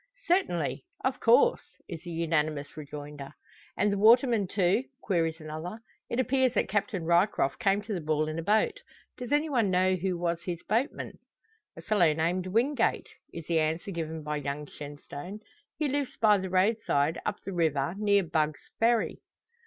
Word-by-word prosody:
"Certainly; 335 - 0 0.2
of 260 0 0
course," 455 - +4 0.3
is 165 -4 -7
the 175 - -9
unanimous 155 -3 -1
rejoinder. 145 -1 -8 0.4
"And 205 0 +2
the 200 - -1
waterman, 230 -1 +5
too?" 195 +6 +1 0.2
queries 165 -4 0
another. 155 +7 -6 0.3
"It 235 - -2
appears 260 -1 +2
that - - +2
Captain 200 -3 -1
Ryecroft 170 -4 +2
came 200 +1 +2
to 215 +1 -4
the 180 - -3
ball 155 0 0
in 155 +1 -3
a - - -1
boat. 210 +5 +1 0.4
Does 250 +1 -7
anyone 290 -8 +2
know 185 +1 +3
who 185 0 -1
was 170 -1 -1
his 170 -1 -5
boatman?" 235 +8 -2 0.6
"A - - -9
fellow 180 -7 +3
named 175 +4 -1
Wingate" 230 +5 +1 0.2
is 165 -2 -8
the 165 0 +1
answer 160 +5 -1
given 160 -2 -4
by 150 0 -2
young 145 +1 -4
Shenstone. 145 +7 -9 0.4
"He 300 0 0
lives 280 -1 -2
by 210 -2 +4
the 190 0 -4
roadside, 185 -6 +1
up - - -3
the 195 - -4
river, 155 -3 +1
near 200 -1 +3
Bugg's 155 -2 -2
Ferry." 230 0 +2
180 Hz, 165 wpm, -29 LUFS, 155-215 Hz, 0.6 s, waterman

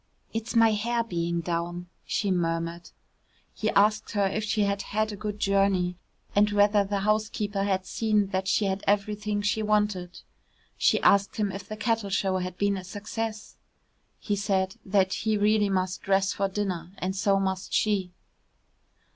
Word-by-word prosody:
"It's 225 +1 -4
my 225 -1 +6
hair 230 +3 0
being 170 -5 -2
down," 175 +1 -3 0.2
she 200 -3 0
murmured. 170 -1 -2 0.6
He 215 - -1
asked 215 +2 +2
her 205 -2 +2
if 210 +3 -1
she 215 0 +1
had 200 0 0
had 215 +2 -1
a - - -5
good 210 0 -5
journey, 195 -3 +2 0.4
and 205 +1 +5
whether 205 0 +4
the 200 0 -2
housekeeper 210 -1 0
had 190 -2 0
seen 215 -1 +1
that 190 0 -2
she 205 - +2
had 195 0 -1
everything 205 +1 0
she 205 +2 +1
wanted. 210 -4 0 0.5
She - - +3
asked 200 0 +4
him 205 -2 0
if 195 0 -7
the 215 - -5
cattle 225 -2 0
show 190 -1 +1
had 180 0 -4
been 200 -1 +1
a 185 - -6
success. 215 +3 -5 0.6
He 205 - -2
said 190 -2 0 0.4
he 220 +1 0
really 210 0 +3
must 185 -1 -1
dress 195 0 +2
for 200 - 0
dinner, 190 -3 -3
and 190 +1 -3
so 195 0 +2
must 190 -1 -2
she. 200 -4 +1
200 Hz, 165 wpm, -27 LUFS, 190-210 Hz, 0.6 s, my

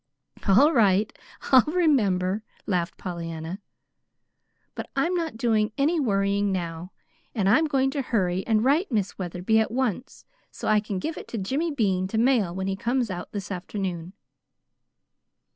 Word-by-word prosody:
"All 270 +12 +6
right, 210 -3 +3 0.4
I'll 260 -1 +9
remember," 215 - +2 0.2
laughed 175 -4 -1
Pollyanna. 170 +1 -6 1.1
"But - - -7
I'm 330 +7 +1
not 330 -8 -2
doing 220 -2 +1
any 310 +4 +2
worrying 200 -4 +1
now; 175 -1 -4 0.4
and 200 -4 +1
I'm 255 +11 +4
going 270 -3 +1
to 280 - -2
hurry 190 -7 0
and 220 -1 +2
write 300 +6 +2
Miss 205 -5 -1
Wetherby 180 +4 0
at 220 - +1
once 250 +1 -3 0.2
so - - -7
I 215 0 +4
can 205 -2 -4
give 315 - -4
it - - -11
to 230 - -5
Jimmy 270 - -1
Bean 195 -10 0
to 220 - -3
mail 225 -7 +2
when 190 0 -3
he 195 0 -1
comes 240 +1 -1
out 175 -1 -6
this 200 -3 -6
afternoon." 180 -2 -4
210 Hz, 155 wpm, -25 LUFS, 185-260 Hz, 1.1 s, I'll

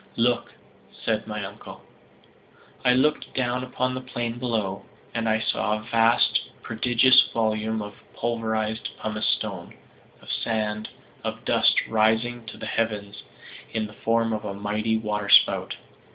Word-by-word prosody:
"Look," 120 +1 +1 0.5
said 110 -1 0
my 105 -2 -4
uncle. - - -10 1.0
I 125 - +5
looked 150 +4 +1
down 125 -1 0
upon 130 0 -1
the 130 - -4
plain 120 -2 -4
below, 110 -6 -2 0.3
and 115 -1 0
I 110 0 +3
saw 105 -1 0
a 110 - -9
vast, 115 0 +3 0.2
a - - -28
prodigious 120 +3 +4
volume 110 -1 0
of 105 0 -8 0.2
pulverized 110 -1 -1
pumice 110 0 -2
stone, 95 -5 -2 0.4
of - - -8
sand, 110 -1 -1 0.3
of - - -5
dust, - - +3
rising 110 +2 +1
to 110 - -8
the - - -7
heavens 105 -2 -2 0.5
in 110 -1 0
the 105 - -10
form 115 +1 +1
of 110 - -3
a 100 - -4
mighty 105 +2 0
waterspout. 105 -2 +3
110 Hz, 140 wpm, -25 LUFS, 105-120 Hz, 1.0 s, I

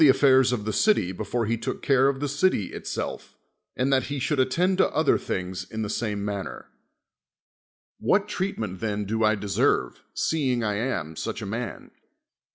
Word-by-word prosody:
affairs 130 -1 +5
of 110 -4 -2
the 110 - -1
city 210 - +3
be 95 +3 -5
fore 115 +3 -1
he 115 +2 +1
took 115 - -5
care 135 -1 +4
of 140 -1 0
the 145 - -1
city 140 - +1
itself, - - -5 0.4
and 135 +2 +2
that 130 - +2
he 145 0 -4
should 140 +2 0
attend 175 +9 +2
to - - +5
other 155 -1 +3
things 90 0 -3
in 110 0 -3
the 105 - -3
same 105 -3 -2
manner. 100 -2 -5 1.3
What 200 +1 +2
treatment 115 - -3
then 105 -2 -2
do 110 +3 -2
1 110 -1 +3
deserve, 95 -11 +1
seeing 130 -7 0
I 105 -1 0
am 90 -10 -2
such 110 +5 -4
a - - -4
man? 115 +4 -5
115 Hz, 175 wpm, -26 LUFS, 105-135 Hz, 1.3 s, affairs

